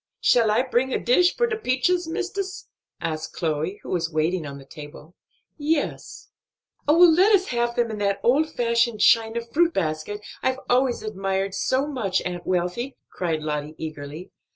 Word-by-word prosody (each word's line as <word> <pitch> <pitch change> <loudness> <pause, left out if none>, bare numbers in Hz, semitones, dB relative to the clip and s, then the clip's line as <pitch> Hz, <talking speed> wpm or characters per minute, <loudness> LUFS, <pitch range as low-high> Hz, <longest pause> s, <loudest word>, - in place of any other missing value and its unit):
"Shall 230 -3 +4
I 220 +4 +3
bring 260 0 0
a - - +1
dish 355 - +3
for 480 - +3
de 455 -2 -1
peaches, 350 0 0
mistis?" 380 +4 -4 0.3
asked 160 -1 -4
Chloe, 160 +4 -2
who - - -9
was 170 -3 -1
waiting 160 +1 0
on 140 0 -7
the 135 - -13
table. 150 +3 -12 0.5
"Yes." 300 0 -2 0.6
"Oh, 300 +2 +5
let 355 +5 +7
us 375 -1 0
have 240 -1 0
them 235 -2 +1
in 215 - -5
that 200 -1 0
old 290 +6 +3
fashioned 235 -4 +1
china 230 +1 +4
fruit 330 +8 +1
basket 160 +4 -2 0.2
I've 260 0 0
always 250 0 +2
admired 195 -2 -2
so 260 +6 0
much, 230 -11 -1
Aunt 175 -1 -5
Wealthy!" 185 +9 -1
cried 160 -4 -2
Lottie 150 0 -3
eagerly. 155 +2 -7
225 Hz, 165 wpm, -24 LUFS, 170-270 Hz, 0.6 s, let